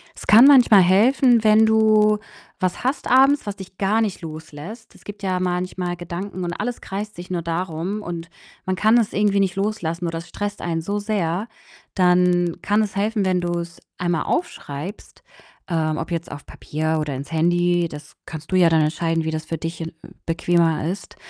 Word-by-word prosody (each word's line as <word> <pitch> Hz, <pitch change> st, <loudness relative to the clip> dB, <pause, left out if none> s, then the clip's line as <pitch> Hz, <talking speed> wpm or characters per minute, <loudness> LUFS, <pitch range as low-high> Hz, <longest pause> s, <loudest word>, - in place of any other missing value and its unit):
Es -, -, -11 dB
kann 225 Hz, +5 st, +8 dB
manchmal 250 Hz, -8 st, +7 dB
helfen, 230 Hz, +6 st, +4 dB
wenn 215 Hz, 0 st, +5 dB
du 215 Hz, -1 st, +4 dB, 0.4 s
was 185 Hz, +2 st, -2 dB
hast 260 Hz, +4 st, -2 dB
abends, 270 Hz, +3 st, +4 dB
was 205 Hz, -, -3 dB
dich 190 Hz, -1 st, -12 dB
gar 205 Hz, +3 st, +1 dB
nicht 210 Hz, -5 st, -2 dB
loslässt. 160 Hz, +7 st, -9 dB
Es -, -, -19 dB
gibt 205 Hz, 0 st, -9 dB
ja 185 Hz, -1 st, 0 dB
manchmal 180 Hz, 0 st, -2 dB
Gedanken, 175 Hz, +2 st, -6 dB
und 175 Hz, 0 st, -3 dB
alles 245 Hz, +6 st, -4 dB
kreist 210 Hz, +2 st, -6 dB
sich 175 Hz, +1 st, -9 dB
nur 175 Hz, -2 st, -1 dB
darum, 170 Hz, +4 st, -3 dB
und 170 Hz, -3 st, -6 dB, 0.4 s
man 185 Hz, -, -1 dB
kann 220 Hz, +5 st, +4 dB
es 230 Hz, -3 st, +1 dB
irgendwie 205 Hz, -1 st, +2 dB
nicht 190 Hz, -1 st, +1 dB
loslassen, 180 Hz, -4 st, -2 dB
oder 165 Hz, 0 st, -3 dB
es 165 Hz, -, -11 dB
stresst 205 Hz, +3 st, -5 dB
einen 165 Hz, -1 st, -2 dB
so 200 Hz, +5 st, -2 dB
sehr. 205 Hz, -2 st, -2 dB, 0.5 s
Dann 180 Hz, -2 st, +3 dB
kann 205 Hz, +2 st, +2 dB
es 205 Hz, -, -5 dB
helfen, 210 Hz, 0 st, 0 dB
wenn 185 Hz, -1 st, +1 dB
du's 170 Hz, -1 st, -4 dB, 0.2 s
einmal 175 Hz, -2 st, -1 dB
aufschreibst, 180 Hz, -, -5 dB, 0.4 s
ähm, 155 Hz, -3 st, -1 dB
ob 165 Hz, +2 st, -5 dB
jetzt 170 Hz, 0 st, -4 dB
auf 145 Hz, -, -9 dB
Papier 155 Hz, +1 st, -3 dB
oder 150 Hz, -3 st, -3 dB
ins 140 Hz, +4 st, -7 dB
Handy, 175 Hz, +1 st, +2 dB
das 150 Hz, 0 st, -11 dB
kannst 160 Hz, +1 st, -9 dB
du -, -, +1 dB
ja 180 Hz, -2 st, +5 dB
dann 160 Hz, -1 st, +3 dB
entscheiden, 165 Hz, +1 st, 0 dB
wie 160 Hz, -, -2 dB
das 155 Hz, 0 st, -4 dB
für 165 Hz, -, -4 dB
dich 165 Hz, +1 st, -6 dB
n 165 Hz, -, -5 dB, 0.3 s
bequemer 165 Hz, -1 st, +1 dB
ist. 190 Hz, +2 st, -7 dB
180 Hz, 190 wpm, -22 LUFS, 165-205 Hz, 0.5 s, kann